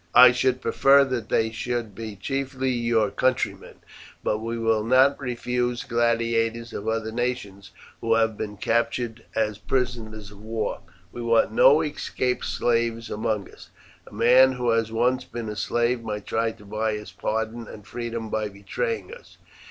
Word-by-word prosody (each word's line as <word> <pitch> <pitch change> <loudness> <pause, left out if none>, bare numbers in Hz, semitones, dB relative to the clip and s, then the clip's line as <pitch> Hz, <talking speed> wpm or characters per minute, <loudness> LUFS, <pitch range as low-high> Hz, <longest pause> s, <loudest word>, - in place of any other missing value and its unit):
I 125 0 +10
should 130 0 +1
prefer 140 +1 +5
that 125 -4 -3
they 110 0 +1
should 115 -1 -3
be 110 0 -7
chiefly 130 +4 -2
your 115 -4 +1
countrymen, 130 +3 -1 0.5
but 105 - 0
we 115 +1 -4
will 115 -1 +1
not 130 +4 +4
refuse 125 -1 -2
gladiators 115 -1 0
of 105 - -5
other 110 0 -1
nations 115 -5 -3 0.3
who 115 0 +2
have 110 -1 +2
been 105 -1 -5
captured 115 +1 -1
as 105 -2 0
prisoners 110 -3 -3
of 100 0 -14
war. 110 +1 -3 0.3
We 120 - -7
want 115 -2 +3
no 140 +7 +6
escaped 135 -4 -2
slaves 115 -1 0
among 105 -2 -2
us. - - -15 0.4
A - - -13
man 125 +5 +5
who 125 -2 0
has 115 -1 +1
once 125 +3 +1
been 115 -2 -6
a 105 - -5
slave 120 +2 0
might 105 -2 -5
try 115 0 0
to 105 - -16
buy 110 +2 -1
his 105 0 -6
pardon 110 +1 -3
and 105 -2 -11
freedom 115 -2 -5
by 110 -1 -1
betraying 440 - -4
us. 485 - -15
115 Hz, 160 wpm, -25 LUFS, 110-125 Hz, 0.5 s, I